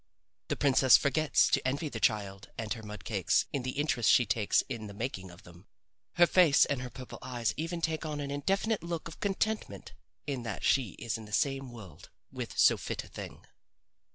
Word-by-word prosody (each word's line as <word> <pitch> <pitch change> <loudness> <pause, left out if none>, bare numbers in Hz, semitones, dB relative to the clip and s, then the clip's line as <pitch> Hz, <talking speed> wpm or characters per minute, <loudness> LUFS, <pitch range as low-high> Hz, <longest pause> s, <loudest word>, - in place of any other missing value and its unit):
The - - -1
princess 135 -2 +5
forgets 140 -3 +2
to - - +2
envy 140 +4 -1
the 120 -6 -5
child 100 -2 -1
and 110 0 -2
her 115 - -9
mud 105 0 -9
cakes 100 -5 +1
in 140 - -1
the 130 +1 -5
interest 125 -6 +1
she 125 - +6
takes 105 0 +2
in 115 -5 -5
the 100 - -10
making 100 -5 -4
of 85 +3 -15
them. 85 +3 -16 0.5
Her 175 - +6
face 170 -5 +5
and 140 -3 -2
her 125 - -5
purple 125 0 -10
eyes 120 -3 -2
even 165 +2 -4
take 160 -1 -1
on 150 -2 -4
an 140 -1 -4
indefinite 195 +9 0
look 170 -1 -4
of 165 - -11
contentment 210 +2 -2 0.3
in 140 -4 -3
that 115 -4 -5
she 125 -8 +2
is 115 -1 -4
in 110 - -10
the 105 - -13
same 135 +3 0
world 95 -10 -12 0.2
with - - -6
so - - +6
fit - - -4
a - - -14
thing. - - -9
130 Hz, 205 wpm, -30 LUFS, 110-150 Hz, 0.5 s, she